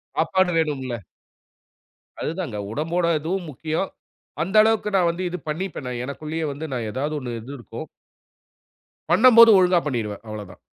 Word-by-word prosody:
சாப்பாடு 180 +3 +2
வேணும்ல? 135 -7 -1 1.2
அதுதாங்க 160 - -3
உடம்போடு 165 +6 0
இதுவும் 175 +3 -3
முக்கியம், 155 +7 -2 0.5
அந்த 190 +5 -5
அளவுக்கு 220 -1 +1
நான் 175 -2 +3
வந்து 180 +2 -5
இது 180 +1 -5
பண்ணிப்பேன், 160 -4 -4
நான் 125 -1 -4
எனக்குள்ளேயே 155 +4 -4
வந்து 150 +3 -6
நான் 115 -3 -2
ஏதாவது 145 +6 -2
1 120 -3 -5
இது 130 +6 -9
இருக்கும். 120 - -8 1.2
பண்ணும்போது 230 +3 +8
ஒழுங்கா 180 -1 +4
பண்ணிடுவேன் 115 -7 -3
அவ்ளோ 105 -1 -5
தான். - - -16
160 Hz, 140 wpm, -23 LUFS, 130-180 Hz, 1.2 s, பண்ணும்போது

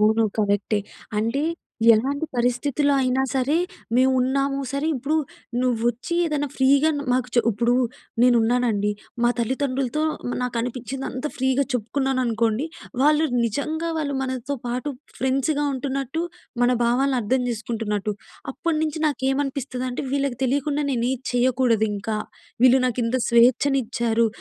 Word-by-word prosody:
అవును 220 +1 +4
కరెక్టే. 205 0 +1 0.4
అంటే 230 +6 0 0.5
ఎలాంటి 275 +7 0
పరిస్థితుల్లో 255 +4 +1
అయినా 255 +1 +1
సరే, 265 +4 +2 0.4
మేము 260 +1 +5
ఉన్నాము. 275 +2 +1
సరే 280 +2 -1
ఇప్పుడు 275 +4 -1 0.5
నువ్వు 250 -3 +1
వచ్చి 240 +8 -3
ఏదైనా 295 -3 -1
ఫ్రీగా 275 +3 +4
న్ - - -2
మాకు 250 0 +1
చె 240 - +6
ఇప్పుడు 235 +3 +1 0.5
నేనున్నానండి, 235 -3 +3 0.3
మా 240 - +5
తల్లిదండ్రులతో 265 +3 -1 0.4
నాకు 250 -1 -2
అనిపించింది 250 +2 -4
అంతా 260 +4 -3
ఫ్రీగా 265 +1 +2
చెప్పుకున్నాను 260 +3 0
అనుకోండి. 230 +3 0 0.4
వాళ్ళు 300 +2 +4 0.2
నిజంగా 305 +9 -2
వాళ్ళు 285 -3 -2
మనతో 260 +1 -3
పాటు 250 +4 -2 0.3
ఫ్రెండ్స్‌గా 275 +3 +1
ఉంటున్నట్టు 270 +3 -2 0.4
మన 245 - +4
భావాలను 255 +3 +2
అర్థం 255 +4 +1
చేసుకుంటున్నట్టు. 215 -2 -2 0.4
అప్పటినుంచి 315 +2 -1
నాకేమనిపిస్తదంటే 270 -2 -2
వీళ్ళకి 275 -3 0
తెలియకుండా 285 +3 0
నేను 240 -3 0
ఏది 260 -1 -5
చేయకూడదు 245 -3 +2
ఇంకా. 210 +2 -3 0.5
వీళ్ళు 255 +1 +6
నాకు 250 0 -1
ఇంత 230 +3 0
స్వేచ్ఛ‌న్నిచ్చారు. 235 -1 +3
255 Hz, 125 wpm, -23 LUFS, 235-280 Hz, 0.5 s, చె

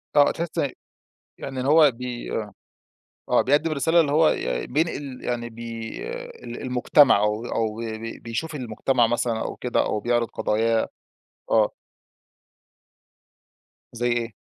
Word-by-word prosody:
آه 145 -1 +6
تحس 170 -1 -4
إ 140 - +1 0.7
يعني 130 -1 -5
هو 150 0 +6
بي 120 0 -6
آه، 105 -2 -3 0.8
آه - - +4
بيقدم 150 +4 +2
رسالة 160 +4 +3
اللي 145 -3 +1
هو 155 +1 +5
ي 60 0 -1
ي - - -8
بينقل 145 -3 -2
يعني 120 -1 -2
بي 115 0 -6 0.6
ال 120 - -7
المجتمع، 125 +1 +5
أو 105 +2 0
أو 110 -2 -1
بي 115 -1 -4
بي 115 +1 -7
بيشوف 120 +8 -4
المجتمع 125 -1 +1
مثلًا 115 -1 0
أو - - -4
كده 125 - 0
أو 105 - -1
بيعرض 120 +1 +1
قضاياه، 115 +2 +1 0.6
آه. 110 -2 +3 2.2
زي 120 +1 -1
إيه؟ 120 -2 -1
120 Hz, 140 wpm, -24 LUFS, 115-140 Hz, 2.2 s, آه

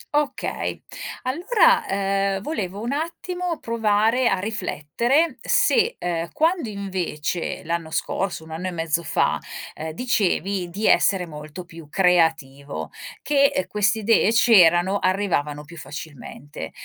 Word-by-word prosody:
Okay. 295 0 -2 0.4
Allora, 420 - +3
ehm, 195 0 0
volevo 205 - -3
un 235 - -3
attimo 335 +3 -3
provare 225 +2 +2
a 195 - +1
riflettere 220 - 0
se, 485 -2 +3
ehm, 170 -1 -2
quando 325 -5 +1
invece, 185 -5 -3
l'anno 165 0 -3
scorso, 180 +1 -2
un 160 - -13
anno 170 +4 -4
e - - -3
mezzo 165 -1 -1
fa, 160 - +1 0.3
ehm, 160 +1 -6
dicevi 195 -5 0
di 200 +5 -4
essere 190 -3 +4
molto 155 +2 -9
più 165 -3 -13
creativo, 160 -6 +1 0.3
che 280 -9 +2
queste 210 +1 +1
idee 220 -1 +3
c'erano, 195 -4 +5
arrivavano 170 -7 0
più 170 +3 -13
facilmente. 145 - -8
195 Hz, 120 wpm, -23 LUFS, 165-235 Hz, 0.4 s, c'erano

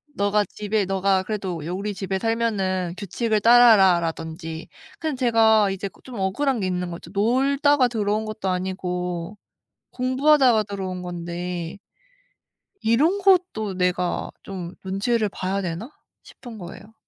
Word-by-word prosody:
"너가 205 +1 +2
집에 210 +1 -2
너가 190 0 +1
그래도 185 -6 -4
여 170 - -3
우리 200 +3 -3
집에 190 0 -3
살면은 195 -6 -1
규칙을 215 +3 -1
따라라."라든지. 175 -8 +4 0.3
그냥 315 -3 -2
제가 225 -4 +4
이제 195 +1 -3
그 - - -16
좀 255 - -10
억울한 235 +7 0
게 190 - -1
있는 180 -1 -2
거죠. 170 0 -9
놀다가 270 +5 +3
들어온 215 -2 -1
것도 215 -3 -4
아니고 180 0 -3 0.5
공부하다가 260 -2 +3
들어온 190 -3 -5
건데 175 0 -5 1.0
'이런 295 - +2
것도 360 - +2
내가 180 -1 -1
좀 185 -2 -7
눈치를 210 +4 0
봐야 195 0 -3
되나?' 185 - -5 0.3
싶은 235 -3 -12
거예요. 200 +4 -11
200 Hz, 290 characters per minute, -23 LUFS, 180-230 Hz, 1.0 s, 따라라."라든지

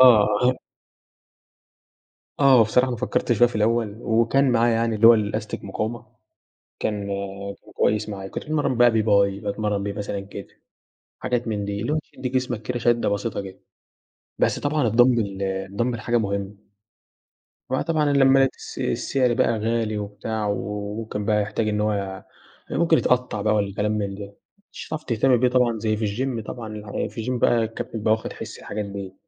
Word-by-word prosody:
آه. 120 0 +6 1.9
آه، 135 -3 +6
هو - - +7
بصراحة 125 +4 +2
أنا 120 - -3
فكرت 125 +1 -1
فيها 120 +1 +5
في 120 - -9
الأول، 110 -1 +1
وكان 120 +4 +2
معايا 120 0 +3
يعني 115 0 0
اللي 110 +2 +6
هو 120 - +10
الأستك 110 0 -2
مقاومة، 110 +4 -4 0.7
كان 105 -2 -2 0.7
كويس 105 0 +1
معايا، 95 -2 -6
كنت - - -6
باتمرن 150 -4 0
بقى 120 0 +6
بيه 110 -1 +2
باي 100 -2 +2
باتمرن 105 0 -2
بيه 100 0 -3
مثلًا 100 -1 -5
كتف، 100 - -9 0.6
حاجات 120 -1 -2
من 105 -2 -2
دي، 100 0 -3
اللي 120 +6 -2
هو 155 - +2
تدّي 130 - -4
جسمَك 125 -3 -2
كده 125 +2 -3
شدَّة 120 0 +2
بسيطة 100 0 -2
كده، 95 -1 -10 0.8
بس - - +2
طبعًا 145 -3 +1
الدامبل، 115 -4 +3
الدامبل 100 +5 -2
حاجة 120 +2 +1
مهمة، 100 -2 -2 1.2
هو 130 - +1
طبعًا 155 -2 +1
لما 135 -1 +5
الس 135 - -4
السعر 130 -3 +1
بقى 115 -2 +1
غالي 110 -1 -1
وبتاع، 105 +1 -4
وممكن 105 +1 -4
بقى 105 -1 +2
يحتاج 110 +2 -2
إن 105 0 0
هو 105 0 +1
يع 95 -1 -4 0.5
ممكن 165 0 +4
يتقطع 125 -6 +1
بقى 105 +1 +2
والكلام 105 +1 0
من 100 -2 -2
ده، 100 0 -9 0.4
مش - - -9
هتعرف 155 -1 -5
تهتم 125 0 +2
بيه 125 - +3
طبعًا 125 -2 +2
زي 110 0 0
في 110 - -1
الGYM 115 +2 -2
طبعًا 105 -3 -5
في 115 - -6
الGYM 125 -1 -1
بقى 120 -1 +4
الكابتن 115 +1 -5
بيبقى 110 0 +1
واخد 110 - -4
حِس - - -8
الحاجات 105 0 -5
دي، 100 -1 -7
110 Hz, 170 wpm, -23 LUFS, 105-120 Hz, 1.9 s, هو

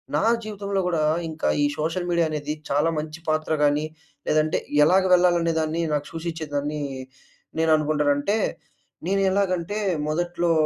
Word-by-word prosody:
నా - - +2 0.2
జీవితంలో 200 -2 -3
గూడా 165 -3 0 0.3
ఇంకా 160 0 -3 0.2
ఈ - - +4
సోషల్ 165 +3 -2
మీడియా 170 -1 +2
అనేది 150 0 -3 0.2
చాలా 145 +4 +2
మంచి 155 +1 -5
పాత్ర 155 0 0
గానీ 145 +1 +2 0.4
లేదంటే 155 0 +2 0.3
ఎలాగ 190 +3 +4
వెళ్ళాలనేదాన్ని 170 -2 +2
నాకు 145 0 -1
సూచించేదాన్ని, 150 -3 -3 0.8
నేను 160 0 +3
అనుకుంటానంటే 150 +5 +1 0.7
నేను 195 +1 +1
ఎలాగంటే, 195 0 0 0.3
మొదట్లో 175 +1 0
160 Hz, 125 wpm, -24 LUFS, 150-175 Hz, 0.8 s, ఈ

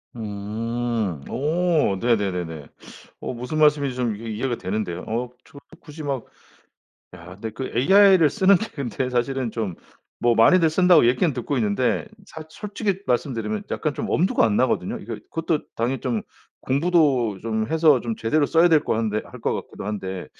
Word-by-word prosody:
음. 110 - -3
오, 160 - +1
네네네네. 90 -10 -1 0.5
어 - - -4
무슨 125 +6 -4
말씀인지 145 -3 +3
좀 120 -4 -1
이해 115 +2 -8
이해가 120 +3 -2
되는데요. 95 -3 -3
어 120 +3 -2 0.2
저 - - -16 0.2
굳이 155 -1 -10
막 135 -4 -3 0.9
야 90 +1 -11
근데 110 +3 -5
그 130 +4 -6
AI 190 - +6
를 155 -3 +5
쓰는게 200 0 +3
근데 130 -2 -3
사실은 125 0 -1
좀 110 -6 -3 0.5
뭐 120 -1 +3
많이들 165 +9 +5
쓴다고 175 -4 +5
얘기는 130 +7 +2
듣고 130 +3 -3
있는데 110 +3 0 0.2
사실 160 0 -10
솔직히 205 +1 -3
말씀드리면 130 - -1
약간 155 -3 -2
좀 - - -4
엄두가 180 +3 +2
안 105 -2 +2
나거든요. 130 -1 0
이거 - - -7 0.2
그것도 165 -1 -1 0.2
당연히 120 +2 -1
좀 120 -4 -2 0.4
공부도 140 - +2
좀 110 -1 -2
해서 155 -5 +4
좀 115 -2 -4
제대로 145 +7 +1
써야될 165 0 +4
것 - - -1
한데 110 -1 -1
할 - - -12
것 - - 0
같기도 - - -7
한데 95 -3 -4
125 Hz, 330 characters per minute, -23 LUFS, 110-155 Hz, 0.9 s, AI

